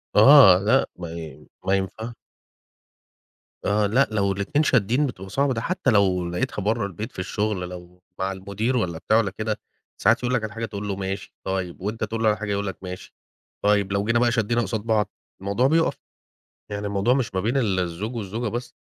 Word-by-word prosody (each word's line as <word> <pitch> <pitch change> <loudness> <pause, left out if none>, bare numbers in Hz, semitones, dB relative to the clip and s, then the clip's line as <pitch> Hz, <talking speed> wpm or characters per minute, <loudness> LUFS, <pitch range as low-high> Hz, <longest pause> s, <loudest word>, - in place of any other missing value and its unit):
آه، 110 -4 +9
لأ، 110 +7 +3
ما 85 -2 -6
ي 80 -4 -9 0.2
ما 95 - +2
ينفعش. 110 +5 -3 1.5
آه، 105 +1 +2
لأ 120 +7 +3
لو 100 -2 +1
الاتنين 100 +10 0
شادين 125 +1 +2
بتبقى 95 -6 -8
صعبة، 140 +5 +1
ده 115 - -3
حتى 180 -1 0
لو 95 -4 +2
لقيتها 90 +3 -2
برا 110 +1 +1
البيت 105 +5 -6
في - - -9
الشغل، 100 -1 -2
لو 90 0 -11 0.2
مع 95 +1 0
المدير 100 +6 -2
والّا 85 -8 -1
بتاع 110 +7 +2
والّا 105 -4 +1
كده، 110 -1 -2 0.4
ساعات - - +3
يقول 125 +1 0
لك 115 - 0
على 105 -1 -4
حاجة 115 +1 -3
تقول 105 -1 -6
له 100 - -2
ماشي 95 0 -5
طيب، 95 -2 -3
وأنت 105 +4 -3
تقول 110 +1 -2
له 110 - +5
الحاجة 105 -1 -3
يقول 100 0 -1
لك 95 - -5
ماشي 90 -1 -8 0.5
طيب، 100 -1 +2
لو 100 0 +1
جينا 115 +2 +2
بقى 120 0 +3
شدينا 115 0 +1
قصاد 110 0 -2
بعض 110 -2 +1 0.3
الموضوع 100 +6 +2
بيوقف، 165 +3 +2 0.7
يعني 105 0 -3
الموضوع 100 +4 +2
مش 120 -6 -1
ما 95 - +1
بين 115 +7 0
ال 105 -8 +1
الزوج 90 +7 -3
والزوجة 110 +2 -3
بس، 120 +2 -5
105 Hz, 195 wpm, -24 LUFS, 95-115 Hz, 1.5 s, آه